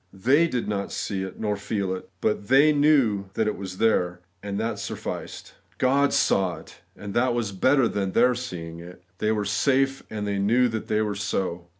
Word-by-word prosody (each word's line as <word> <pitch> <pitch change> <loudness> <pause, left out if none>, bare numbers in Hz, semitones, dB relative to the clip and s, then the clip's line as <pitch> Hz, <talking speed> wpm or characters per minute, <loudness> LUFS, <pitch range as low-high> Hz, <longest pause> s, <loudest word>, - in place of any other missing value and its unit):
They 130 - +3
did 125 -7 -2
not 100 -1 -2
see 95 -3 -3
it, 95 -1 -6
nor 105 -2 -1
feel 100 -2 -2
it; 95 - -7
but 105 -1 -1
they 140 +4 +5
knew 140 -9 +3
that 110 - +1
it 105 - -1
was 95 -1 -7
there, 90 -5 +1 0.2
and 100 0 -4
that 115 +1 -2
sufficed. - - -6 0.2
God 140 +2 +3
saw 95 -3 +2
it, 80 - -15
and 100 -1 -8
that 125 0 +2
was 115 -4 -1
better 130 +6 +3
than 95 -3 -2
their 125 0 +4
seeing 85 -9 -6
it. 90 +1 -12 0.2
They 110 - +1
were 105 -2 -1
safe; 135 +7 +1
and 105 -1 -4
they 100 -1 -1
knew 120 +6 +3
that 110 -1 -4
they 110 0 +1
were 105 -1 -2
so. 95 -3 -3
105 Hz, 200 wpm, -25 LUFS, 95-125 Hz, 0.2 s, they